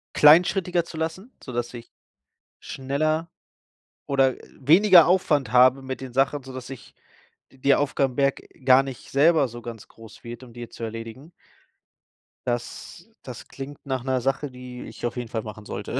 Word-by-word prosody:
kleinschrittiger 175 +3 +5
zu 170 - -11
lassen, 165 +9 -5
sodass 120 -2 -4
ich 120 -1 -10 0.7
schneller 155 +5 -2 0.7
oder, 135 -2 +2
äh, - - -17
weniger 170 +4 +7
Aufwand 150 -9 +1
habe 130 +2 +6
mit 130 0 -6
den 130 -1 -7
Sachen, 135 +2 +1
sodass 130 -1 -9
ich 135 -3 -11 0.6
d 135 - -21
der 140 +1 +3
Aufgabenberg 140 -1 0 0.2
gar 130 0 +6
nicht 135 -2 -9
selber 150 0 +4
so 120 0 -10
ganz 115 -2 -9
groß 115 0 -16
wird, 120 +2 -8
um 125 - -13
die 120 0 -8
zu 115 - -10
erledigen. 115 +6 -7 1.2
Das 120 -1 -5 0.2
das - - -9
klingt 140 +1 -9
nach 130 -2 -2
’ner 130 -1 0
Sache, 135 +2 -1
die 125 -1 -9
ich - - -12
auf 120 - -7
jeden 120 -2 -5
Fall 110 - -3
machen 105 0 -10
sollte. - - -4
135 Hz, 160 wpm, -24 LUFS, 120-145 Hz, 1.2 s, weniger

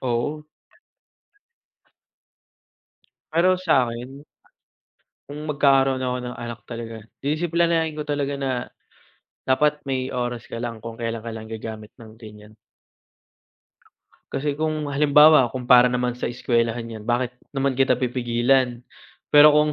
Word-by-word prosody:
Oo. 130 +5 -2 2.9
Pero 175 +3 +4
sa'kin, 135 -5 -1 1.0
kung 150 +2 -8
magkakaroon 135 -2 +3
ako 125 0 -1
ng 125 0 -6
anak 120 0 -7
talaga, 115 -1 -7 0.2
disiplinahin 165 +1 0
ko 150 - -4
talaga 145 -1 -2
na, 135 -1 -2 0.9
dapat 150 +3 +2
may 130 -1 -2
oras 120 -1 -4
ka - - -6
lang 115 -1 -5
kung 115 0 -7
kailan 115 -1 -4
ka 115 - -7
lang 110 -1 -7
gagamit 110 -1 -7
ng 110 -1 -13
ganyan. 105 -1 -13 1.8
Kasi 145 +1 -2
kung 155 0 -2
halimbawa 145 -1 +5
kung 125 0 -6
para 125 0 +7
naman 125 0 -1
sa 125 - -3
eskwelahan 115 -1 -1
'yan, 110 -2 -8
bakit 120 +2 -1 0.2
naman 135 -1 -1
kita 135 +1 +2
pipigilan? 125 0 +1 0.6
Pero 150 +1 +9
kung 150 0 +3
130 Hz, 120 wpm, -23 LUFS, 120-145 Hz, 2.9 s, Pero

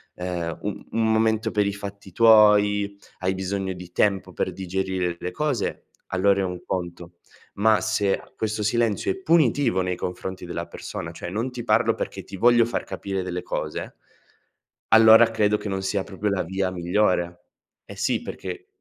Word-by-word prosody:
ehm, 90 -2 -4
u - - -4 0.2
un 115 0 +1
momento 110 0 +2
per 105 -1 +1
i 100 - -1
fatti 100 -1 -8
tuoi, 105 -2 +5 0.2
hai 95 +1 0
bisogno 95 0 -3
di 90 -1 -8
tempo 100 -1 +1
per - - -2
digerire 95 -1 -2
le 90 +1 -5
cose, 145 -8 -2 0.2
allora 100 +1 +2
è - - 0
un 90 -1 -4
conto. 85 -1 -5 0.4
Ma 110 +1 +4
se 105 -3 0
questo 110 -1 -2
silenzio 110 -1 +1
è - - -2
punitivo 145 - +2
nei 90 0 -1
confronti 90 +1 -5
della 85 -1 -5
persona, 85 - -7
cioè 85 - -7
non 115 +7 -2
ti 125 -1 -6
parlo 110 -1 +3
perché - - -5
ti 100 - -9
voglio 120 +3 +5
far 120 - -3
capire 95 -2 -4
delle 90 -1 -4
cose - - -4 1.0
allora 110 +1 +8
credo 105 -1 +2
che 105 - -7
non 95 -1 -2
sia 95 0 -1
proprio 100 +2 -3
la 100 -1 0
via 95 +2 -1
migliore. 90 -1 0 0.4
Eh - - -10
sì, - - 0
perché 385 -2 -7
100 Hz, 170 wpm, -24 LUFS, 90-110 Hz, 1.0 s, allora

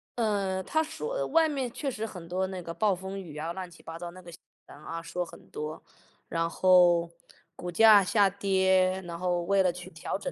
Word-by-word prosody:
呃， 200 -5 0
他 315 - +1
说 - - -3
外 325 -1 +4
面 265 -5 -2
确 280 +2 -3
实 220 -1 -4
很 180 -6 -9
多 185 +2 -1
那 185 -1 -6
个 170 0 -6
暴 210 0 +2
风 190 +2 -6
雨 155 -4 -10
啊， 160 +2 -3
乱 185 -1 -6
七 170 - -17
八 165 0 -7
糟 175 -1 -6
那 185 +1 -12
个 170 -1 -12
新 - - -13 0.3
闻 - - -13
啊， 165 +2 -6
说 175 +1 -3
很 - - -15
多， 155 +1 -6 0.5
然 165 0 0
后 175 -2 +5 0.5
股 180 - -6
价 210 +1 +7
下 200 +1 +3
跌， 190 -1 +2
然 170 -1 -6
后 180 -1 0
为 195 +2 +3
了 180 - +3
去 180 0 -10
调 - - -4
整 - - -5
185 Hz, 235 characters per minute, -28 LUFS, 170-200 Hz, 0.5 s, 价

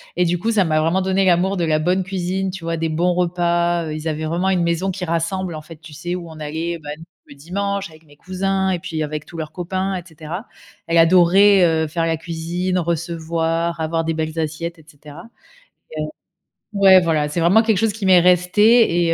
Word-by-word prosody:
et 180 - +2
du 175 0 0
coup, 225 - -2
ça 210 -4 +3
m'a 155 -3 +1
vraiment 165 +4 +1
donné 190 +1 +1
l'amour 185 +2 +2
de 170 - 0
la 155 -1 +1
bonne 180 +4 +1
cuisine, 190 0 -2
tu 185 -2 -9
vois? 165 0 -2
Des 165 0 -1
bons 170 +3 +1
repas, 175 -1 0
heu, 155 - -4
ils 155 +1 -5
avaient 155 0 -3
vraiment 175 +4 -1
une 180 -2 +1
maison 170 +3 0
qui 190 0 -5
rassemble 170 +1 -2
en 155 - -7
fait, 160 +1 -13
tu 160 -1 -13
sais, 175 +4 -4
où 175 -2 -7
on 160 -1 -11
allait, 160 +3 -4
bah, 145 -1 -7 0.4
le 140 - -12
dimanche 195 +6 -3
avec 160 0 -18
mes 145 -1 -20
cousins 190 +3 -2
et 180 -2 -1
puis 165 -3 -4
avec 150 0 -5
tous - - -14
leurs 155 -1 -5
copains, 185 +2 -3
et 180 - -7
cetera. 165 +4 -8 0.4
Elle 165 0 +1
adorait, 185 +3 +5
heu, 160 -1 +1
faire 165 +2 -2
la 165 0 0
cuisine, 170 +3 -3
recevoir, 165 0 -2
avoir 165 +1 -1
des 165 - -1
belles 160 0 -3
assiettes, 165 +2 -4
et 155 - -19
cetera, 150 +1 -13 0.7
et - - -2
heu - - -1 0.7
ouais, 190 -1 +7
voilà, 160 -4 0
c'est 150 - -3
vraiment 175 +7 +5
quelque 220 -3 +2
chose 220 +1 +1
qui 210 -1 -5
m'est 185 -1 +6
resté 180 +2 +4
et 165 - +2
170 Hz, 225 wpm, -20 LUFS, 160-185 Hz, 0.7 s, ouais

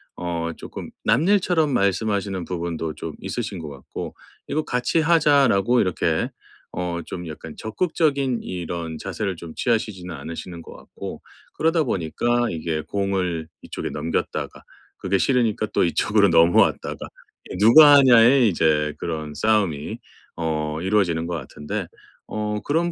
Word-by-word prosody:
어 85 -1 -3
조금 - - -8
남일처럼 165 - +3
말씀하시는 100 -3 0
부분도 85 -2 -3
좀 80 0 -7
있으신 105 -5 -4
것 80 -3 -7
같고. 70 -2 -8 0.3
'이거 155 - 0
같이 125 +5 0
하자.' 150 -4 +4
라고 120 +4 +3
이렇게 90 -3 0 0.4
어 85 -1 -3
좀 90 -1 -6
약간 80 0 -9
적극적인 140 -1 0
이런 85 -2 -5
자세를 100 -4 -3
좀 80 -1 -10
취하시지는 105 -7 -1
않으시는 85 +1 -7
것 - - -12
같고. - - -9 0.3
그러다 165 +1 +2
보니까 120 - 0
이게 80 -1 -2
공을 95 -3 -2 0.2
이쪽에 - - -5
넘겼다가 80 0 -3 0.4
그게 95 +1 0
싫으니까 115 -2 +1
또 - - +3
이쪽으로 100 +4 +3
넘어왔다가. 85 +1 +3 0.6
누가 145 +8 +9
하냐의 125 -2 +6
이제 75 -4 +1
그런 80 -3 -4
싸움이 100 -8 0 0.4
어 80 -2 -2
이루어지는 90 -4 +1
것 85 - -4
같은데. 75 +1 -5 0.4
어 105 0 -3
그런 165 +4 0
95 Hz, 305 characters per minute, -23 LUFS, 85-120 Hz, 0.6 s, 누가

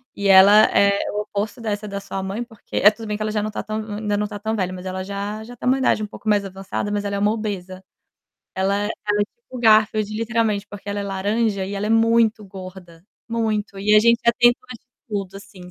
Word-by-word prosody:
e 200 0 -2
ela 200 +3 +8
é 200 0 +4
o 210 - -2
oposto 210 +3 -4
dessa 210 -1 -3
da 200 0 -4
sua 195 -1 -5
mãe 200 +5 -3
porque 225 -3 -9
eh, 210 - +7
tudo 225 0 -9
bem 210 0 -2
que - - -10
ela 215 - -2
já 210 -1 -1
não 215 - -3
tá - - -4
tão 215 0 -3
hum, 215 -1 -6
ainda 210 -1 -1
não 210 0 -1
tá 205 -1 -7
tão 220 +1 -2
velha 185 -3 -1
mas 185 0 -8
ela 185 0 -4
já 200 +2 -5
já 245 +2 -11
tem - - -4
uma 260 +1 +4
idade 235 -4 +2
um - - -3
pouco 215 0 -6
mais 205 -1 +2
avançada, 195 +2 -4
mas 205 0 -1
ela 200 0 -2
é - - -1
uma 205 +1 +2
obesa. 190 -4 -5 0.7
Ela 200 +2 0
ela 215 - -2 0.3
é - - +3
tipo 470 - -35
o 255 - -7
Garfield, 215 -1 +4
literalmente, 225 -3 0
porque 205 0 -10
ela 200 0 -2
é - - -3
laranja 200 +1 -1
e 200 +1 -5
ela 200 +1 -2
é - - -1
muito 225 -1 +3
gorda, 185 -2 -11 0.2
muito 215 -3 -2
e 210 +2 +3
a 210 - +8
gente 235 +1 +4
já 235 - +6
tentou 240 +1 +3
de 245 - -14 0.2
tudo, 195 -2 -4
assim, 185 -3 -13
205 Hz, 250 wpm, -22 LUFS, 195-220 Hz, 0.7 s, ela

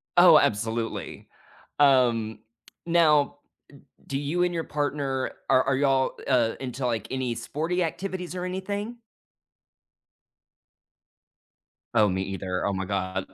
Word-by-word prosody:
Oh, - - +8
absolutely. 115 +2 -2 0.5
Um, 120 -6 +3 0.5
now, 165 -3 +5
m - - -12 0.7
do 135 - -3
you 155 +5 0
and 180 0 0
your 165 -1 -2
partner 140 -2 -2 0.2
are, 130 -1 +5
are 135 0 +1
y'all, 135 -2 +1
uh, 120 -4 +2
into, 130 0 -4
like, 115 -3 -1
any 130 -3 -2
sporty 160 +10 -2
activities 180 +1 -4
or 180 - -4
anything? 200 +5 -4 3.0
Oh, 110 -3 +4
me 95 +1 -1
either, 95 -1 -3
oh 100 - 0
my 95 0 -3
god. 95 -1 -2
135 Hz, 120 wpm, -26 LUFS, 115-165 Hz, 3.0 s, Oh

